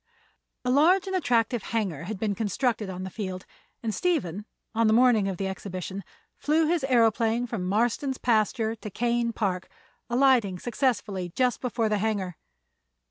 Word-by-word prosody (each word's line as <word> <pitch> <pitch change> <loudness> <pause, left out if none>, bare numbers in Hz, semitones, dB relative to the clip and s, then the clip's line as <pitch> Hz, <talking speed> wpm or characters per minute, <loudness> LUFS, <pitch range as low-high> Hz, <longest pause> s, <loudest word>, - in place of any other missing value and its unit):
A 250 - +2
large 345 +8 +4
and 380 -1 -3
attractive 240 - +1
hangar 190 -9 -2
had 210 +2 -4
been 205 +1 -1
constructed 220 +1 -1
on 185 0 -5
the 190 - -6
field, 185 -3 -5 0.4
and 220 -2 -1
Stephen, 210 - -1 0.3
on 230 0 +2
the 215 - +4
morning 235 -5 +4
of 190 -2 -3
the 195 - -2
exhibition, 190 0 -5 0.4
flew 315 +2 +2
his 335 +1 +1
aëroplane 235 -2 +2
from 190 -6 -3
Marston's 240 +6 0
pasture 225 0 +1
to 220 -1 -8
Kane 235 +3 0
Park, 190 -5 -2 0.4
alighting 240 -6 +3
successfully 215 -5 -1
just 250 +7 0
before 235 -3 0
the 210 -1 0
hangar. 200 -4 -1
225 Hz, 155 wpm, -27 LUFS, 195-250 Hz, 0.4 s, large